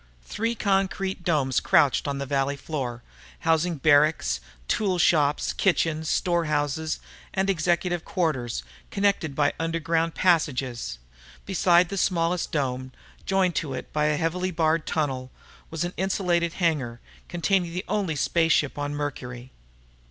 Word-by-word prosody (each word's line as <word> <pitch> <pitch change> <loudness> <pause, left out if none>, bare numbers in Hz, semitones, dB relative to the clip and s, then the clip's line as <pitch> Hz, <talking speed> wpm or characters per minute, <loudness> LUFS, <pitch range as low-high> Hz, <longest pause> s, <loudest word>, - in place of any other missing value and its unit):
Three 230 +2 -2
concrete 195 -2 0
domes 140 -7 +2
crouched 140 0 +3
on 140 -1 -2
the 140 - -3
valley 140 0 0
floor, 130 -5 -4 0.4
housing 165 +2 +2
barracks, 150 +1 +3 0.3
tool 195 -4 +1
shops, 150 -4 +2
kitchens, 160 -4 +1
store 175 -3 +1
houses, 150 +1 -1 0.4
and 195 0 +2
executive 175 0 0
quarters, 150 - -1 0.3
connected 195 -7 0
by 145 -1 +2
underground 165 0 0
passages. 130 - +1 0.5
Beside 180 -2 +3
the 200 - -4
smallest 175 -1 0
dome, 130 -3 -2 0.4
joined 190 -2 +2
to 140 -5 -2
it - - -8
by 150 0 +1
a 150 -1 +2
heavily 180 +4 -1
barred 160 -2 +1
tunnel, 135 -5 -1 0.4
was 160 +1 -3
an 175 +1 -3
insulated 175 -3 0
hangar, 145 -10 -1 0.3
containing 175 0 +1
the 180 +3 -4
only 190 -7 -1
space 165 +3 +2
ship 145 0 0
on 145 0 -2
Mercury. 130 -4 -5
160 Hz, 135 wpm, -25 LUFS, 145-180 Hz, 0.5 s, crouched